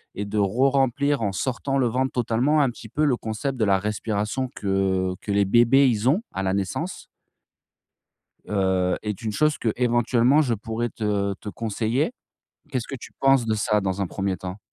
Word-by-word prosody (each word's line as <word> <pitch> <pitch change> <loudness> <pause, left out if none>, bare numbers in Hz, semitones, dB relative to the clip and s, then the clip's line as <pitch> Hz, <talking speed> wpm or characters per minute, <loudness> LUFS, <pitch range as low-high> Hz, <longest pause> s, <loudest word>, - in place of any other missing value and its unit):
et 100 - -3
de 105 +1 -2
re-remplir 135 +6 +2
en 105 -3 0
sortant 135 +6 -1
le 130 -3 +2
ventre 130 +3 0
totalement. 125 +5 +1
Un 135 - +3
petit 115 -1 -12
peu 150 +7 0
le 135 - +3
concept 120 +5 -3
de 110 - +3
la 100 -1 +3
respiration 105 +4 -2
que 95 -2 0
que 105 - -4
les 100 0 +3
bébés 120 +6 +5
ils 115 +1 +1
ont, 185 - +2
à 95 - -2
la 95 - 0
naissance. 100 - -3 1.4
Heu, 95 -2 +1
est 105 -3 -4
une 110 -2 -2
chose 155 +4 +1
qu'éventuellement 120 +4 +2
je 125 -5 0
pourrais 115 +2 -3
te 105 -3 -1
te 105 - -8
conseiller. 115 - -1 0.6
Qu'est-ce 130 -5 -3
que 135 - -5
tu - - -11
penses 135 -3 +4
de 110 - +1
ça 105 0 +1
dans 95 0 -2
un 95 - -1
1er 95 +1 -2
temps? 95 +2 -7
110 Hz, 185 wpm, -24 LUFS, 100-130 Hz, 1.4 s, bébés